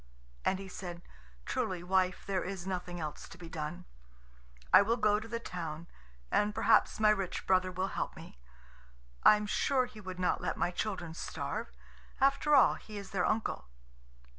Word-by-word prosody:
And 190 - +2
he 195 0 -8
said: 175 -2 -7 0.4
"Truly, 180 -2 -2
wife, 185 0 +1
there 195 -2 -1
is 185 -1 -5
nothing 180 -2 -4
else 155 -2 -6
to - - -12
be 175 -2 -9
done. 165 +2 -5 0.9
I - - +10
will 225 +4 +1
go 210 -2 +3
to 220 - -9
the 230 +1 -3
town, 165 -6 -5 0.5
and 210 0 +2
perhaps 225 - +4
my 215 -1 +6
rich 195 -4 -2
brother 185 -1 +3
will 185 +1 -2
help - - -3
me. - - -12 0.8
I - - +8
am 210 0 -2
sure 255 +5 +2
he 245 -4 -12
would 185 -2 -7
not 180 -1 +1
let - - -2
my 175 - +1
children 180 -4 -3
starve. - - -4 0.5
After 275 +2 +4
all, 265 - +7
he 215 -1 -9
is 200 -1 -8
their 190 -2 +1
uncle." 220 - -1
190 Hz, 175 wpm, -32 LUFS, 180-215 Hz, 0.9 s, I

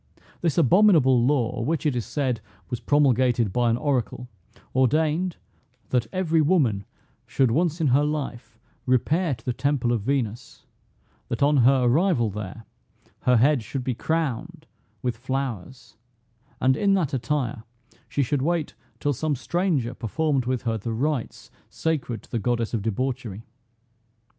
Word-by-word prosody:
This 165 -4 0
abominable 160 - +5
law, 125 -4 +1
which, 155 +5 -1
it 145 -4 +1
is 120 - -3
said, 130 -6 -1 0.3
was 120 - -2
promulgated 125 -7 +2
by 120 -1 +2
an 115 - +2
oracle, 125 -3 -1 0.5
ordained, 155 +7 +1 0.5
That 120 -3 +1
every 165 -4 +1
woman 140 - +2 0.4
should 130 -4 +2
once 165 +5 +1
in 155 -4 +2
her 135 +4 +4
life 145 -6 -4 0.3
repair 145 +5 +2
to 115 - -21
the 125 - 0
temple 140 -2 0
of 120 -3 0
Venus; 120 -2 -3 0.6
that 120 - -1
on 145 +1 +4
her 130 +1 +5
arrival 125 - +2
there, 105 +2 -7 0.6
her 125 -1 +5
head 135 +3 +4
should 125 +4 -5
be 125 - -1
crowned 155 -1 -2 0.4
with 125 -3 -1
flowers, 125 -3 -5 0.6
and 130 0 +3
in 195 +5 +2
that 160 -7 0
attire, 130 -3 -1 0.5
she 140 - 0
should 135 +2 0
wait 165 +1 -1 0.3
till 145 - 0
some 150 +3 -1
stranger 155 -4 -1
performed 135 +2 -1
with 130 -1 -1
her 115 -2 -1
the 115 +3 -4
rites 135 +1 -3 0.2
sacred 150 -8 -2
to - - -21
the 115 - -1
goddess 120 +1 -1
of 115 - 0
debauchery. 115 -1 -3
130 Hz, 150 wpm, -25 LUFS, 120-150 Hz, 0.6 s, abominable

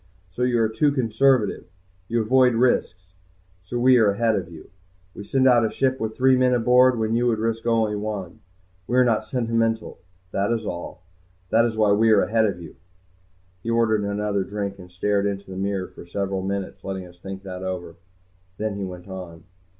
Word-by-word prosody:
So 105 - -7
you 125 -1 +2
are 110 - +3
too 140 +7 +1
conservative, 125 -3 +1 0.4
you 115 +1 0
avoid 125 +1 +4
risks. 95 -7 0 0.5
So 95 +7 -5
we 125 +1 +5
are 110 -3 +4
ahead 110 +1 +1
of 90 -3 -3
you. 80 -2 -13 0.4
We 100 - -8
send 130 +5 +2
out 120 -2 +5
a 110 - +1
ship 130 +3 0
with 110 0 -4
three 130 0 +4
men 125 0 +3
aboard 125 +1 +4
when 110 0 -1
you 120 +1 +2
would 115 -2 +1
risk 115 +1 -2
only 110 -2 +2
one. 105 -4 -5 0.5
We 125 - 0
are 130 - +6
not 110 -2 0
sentimental, 115 -2 -1 0.3
that 100 +3 0
is 115 -2 -1
all. 90 0 -6 0.5
That 115 +1 +4
is 115 -2 -2
why 105 -2 +3
we 110 +3 +4
are 105 -2 +5
ahead 110 +1 +2
of 95 -4 -2
you." 85 -3 -11 0.8
He 115 - -5
ordered 115 -2 +2
another 100 -1 -1
drink 100 0 -5
and 90 -1 -12
stared 100 +3 0
into 100 0 -4
the - - -7
mirror 95 -1 -2
for - - -13
several 95 +1 -2
minutes, 100 0 -4
letting 95 -1 -5
us 90 0 -16
think 95 +1 -8
that 90 -1 -7
over. 90 -3 -5 0.6
Then 105 -1 -3
he 100 - -4
went 90 0 -8
on. 90 -3 -9
110 Hz, 195 wpm, -23 LUFS, 95-115 Hz, 0.8 s, are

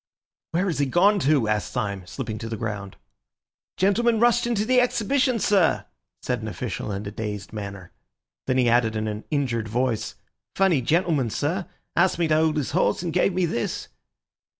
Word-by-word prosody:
"Where 175 +4 0
has 165 -7 -1
he 140 - +2
gone 200 +8 +4
to?" 140 - +2
asked 105 -1 -1
Syme, 100 -6 -3
slipping 110 0 -5
to 115 - -6
the 115 - -4
ground. 100 -3 -5 0.8
"Gentleman 225 +4 +2
rushed 240 0 +3
into 220 -3 0
the 250 +1 +4
Exhibition, 250 +2 +1
sir!" 195 -6 +2 0.4
said - - -1
an - - -5
official 105 - -4
in 100 +1 -4
a 100 - -5
dazed 105 -2 -5
manner. 100 -3 -7 0.6
Then 130 - +1
he 125 -2 +3
added 115 -2 +3
in 110 0 -1
an 105 0 -5
injured 125 -7 -1
voice: 115 -1 -1 0.4
"Funny 190 -8 +3
gentleman, 155 -2 +1
sir. 170 - -2 0.3
Asked 175 +1 +3
me 170 -1 +1
to 155 - +4
hold 155 0 +2
his 145 - -1
horse, 175 +2 +1
and 170 -2 -3
gave 180 +1 +2
me 180 0 +1
this." 120 -8 -3
145 Hz, 180 wpm, -24 LUFS, -, 0.8 s, gone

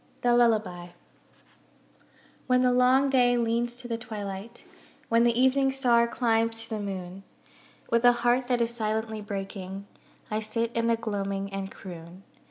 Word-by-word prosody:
THE 245 0 +4
LULLABY 215 -7 +1 1.5
When 250 -1 +3
the 250 - +4
long 255 +2 +4
day 245 -2 +4
leans 235 +1 0
to 245 0 -9
the 230 -1 -3
twilight, 215 -1 -7 0.5
When 230 +1 +4
the 235 0 +2
Evening 270 +1 +3
star 240 -3 +3
climbs 225 -1 0
to 225 - -11
the 220 - -2
moon, 190 -2 -6 0.7
With 235 0 +2
a 245 - +8
heart 245 +1 +2
that 245 -1 +1
is 235 0 0
silently 220 -1 -2
breaking, 195 -1 -6 0.5
I 215 - 0
sit 225 +2 -2
in 230 0 0
the 230 - +3
gloaming 200 -3 -3
and 195 0 -4
croon. 175 0 -11
230 Hz, 155 wpm, -27 LUFS, 200-240 Hz, 1.5 s, a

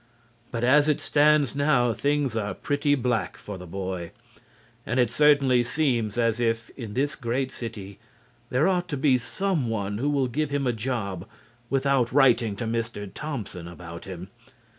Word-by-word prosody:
But 115 -1 -3
as 145 +4 +5
it 150 - +2
stands 150 -2 +3
now 135 -5 +3
things 145 -2 0
are 105 -3 -2
pretty 145 0 +1
black 120 -4 -1
for 100 -3 -8
the 90 - -9
boy, 90 -1 -5 0.7
and 125 +3 -1
it 120 -2 +3
certainly 140 -3 +4
seems 120 -4 0
as 115 -1 +1
if 115 -1 -1
in 115 -5 -8
this 145 +3 0
great 130 +1 -2
city 100 -4 -7 0.5
there 130 +7 +2
ought 180 -2 +1
to 145 - -3
be 130 -2 +3
some 175 -2 -1
one 105 -2 -2
who 140 +4 0
will 140 -3 +1
give 150 +4 -1
him 140 -1 -1
a 125 - +1
job 105 -6 -3 0.4
without 135 -3 +2
writing 120 -6 +4
to 115 - -4
Mr. 115 -2 -3
Thompson 110 - -5
about 85 -1 -9
him. 95 -1 -8
120 Hz, 165 wpm, -26 LUFS, 110-140 Hz, 0.7 s, as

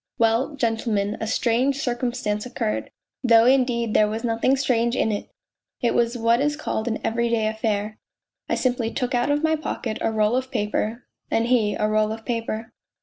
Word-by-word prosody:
" - - -68
Well, 230 +6 +2
gentlemen, 225 -4 0
a 220 - -2
strange 245 +4 +1
circumstance 240 -6 -2
occurred, 110 - -2 0.3
though 230 -2 +6
indeed 245 -3 +2
there 210 - +4
was 220 +2 -4
nothing 235 +3 +2
strange 240 -3 +1
in 225 - +1
it: 205 - -4 0.5
it 240 - +1
was 235 +1 +1
what 230 +2 +3
is 295 +1 +1
called 230 -7 -3
an 225 -1 0
everyday 230 -1 +1
affair 215 -1 -2 0.5
I - - +2
simply 245 -3 0
took 250 +2 -2
out 245 +2 +1
of 290 +2 +1
my 315 0 +3
pocket 245 -7 -4
a 225 - +1
roll 215 +1 +2
of 260 0 -1
paper... 220 +1 -2 0.3
and 225 - +1
he 225 -5 +2
a 210 - 0
roll 215 0 +1
of 225 0 -7
paper." 230 -1 -3
230 Hz, 185 wpm, -23 LUFS, 220-250 Hz, 0.5 s, though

